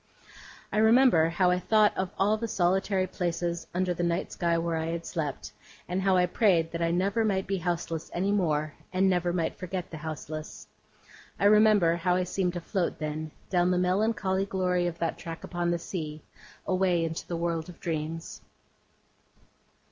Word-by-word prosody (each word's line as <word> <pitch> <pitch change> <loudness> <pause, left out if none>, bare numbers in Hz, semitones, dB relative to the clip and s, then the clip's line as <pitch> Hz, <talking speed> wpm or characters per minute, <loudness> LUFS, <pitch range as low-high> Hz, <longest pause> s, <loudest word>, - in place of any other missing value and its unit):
I - - +2
remember 220 -7 +5
how 180 +2 +2
I 180 - +1
thought 215 +2 +3
of 190 -1 -1
all 205 +2 +3
the 230 +1 -3
solitary 190 -1 +1
places 170 -1 -3
under 180 0 0
the 175 - -4
night 170 +1 -1
sky 170 -1 0
where 165 0 -1
I 160 0 -2
had 170 0 -3
slept, 150 -5 -4 0.4
and 180 +2 -1
how 190 -1 +3
I 180 - +4
prayed 175 -4 +2
that 170 - -4
I 165 - +2
never 195 +6 +1
might 195 -3 0
be 195 - -1
houseless 170 -2 -3
any 190 +3 0
more, 155 -6 0 0.2
and 190 +1 +2
never 180 -2 +1
might 170 -2 -2
forget 185 -1 -5
the 160 - -6
houseless. 155 0 -7 0.7
I - - +1
remember 210 -5 +5
how 180 +1 +1
I 185 - +1
seemed 180 0 -1
to 175 - -4
float, 180 +1 -1
then, 155 0 -4 0.2
down 180 -1 +3
the 180 - +2
melancholy 195 +1 +1
glory 180 -2 0
of 170 -1 -4
that 165 - -2
track 165 0 -7
upon 175 -1 -2
the 175 - +1
sea, 155 -3 -6 0.4
away 185 -2 +2
into 165 0 -5
the 170 - -3
world 170 -1 -2
of 175 - -12
dreams. 165 -1 -4
175 Hz, 180 wpm, -28 LUFS, 165-190 Hz, 0.7 s, remember